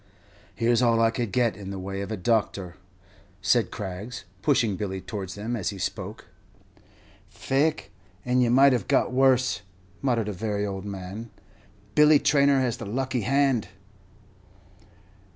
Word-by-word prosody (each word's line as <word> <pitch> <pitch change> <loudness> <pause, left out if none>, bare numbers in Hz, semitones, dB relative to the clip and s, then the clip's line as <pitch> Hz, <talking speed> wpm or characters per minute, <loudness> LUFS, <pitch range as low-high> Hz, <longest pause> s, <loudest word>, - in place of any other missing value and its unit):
"Here 120 +2 +2
's 115 - +2
all 115 -2 +3
I 115 0 +4
could 115 -3 -3
get 120 -2 +1
in 100 -2 -8
the 100 - -5
way 95 +1 -5
of 100 - -5
a 110 - -2
doctor," 95 -3 0 0.7
said 100 +1 +2
Craggs, 100 +5 -6 0.2
pushing 120 -9 +2
Billy 95 -1 -4
towards 95 -2 -6
them 110 +4 -3
as 105 -6 -2
he 100 - -6
spoke. 95 - -5 1.0
"Faix, 150 +4 0 0.4
and 125 +1 +2
ye 120 - +3
might 135 +2 +6
have 120 -5 -1
got - - +2
worse," 130 -1 +3 0.4
muttered 120 -5 0
a - - -3
very 105 +1 -2
old 95 -1 -5
man; 100 +3 -7 0.6
"Billy 150 0 +6
Traynor 140 -1 +3
has 125 -3 -1
the 115 - -7
lucky 130 +3 -2
hand.'" 135 -2 +2
115 Hz, 150 wpm, -26 LUFS, 100-130 Hz, 1.0 s, might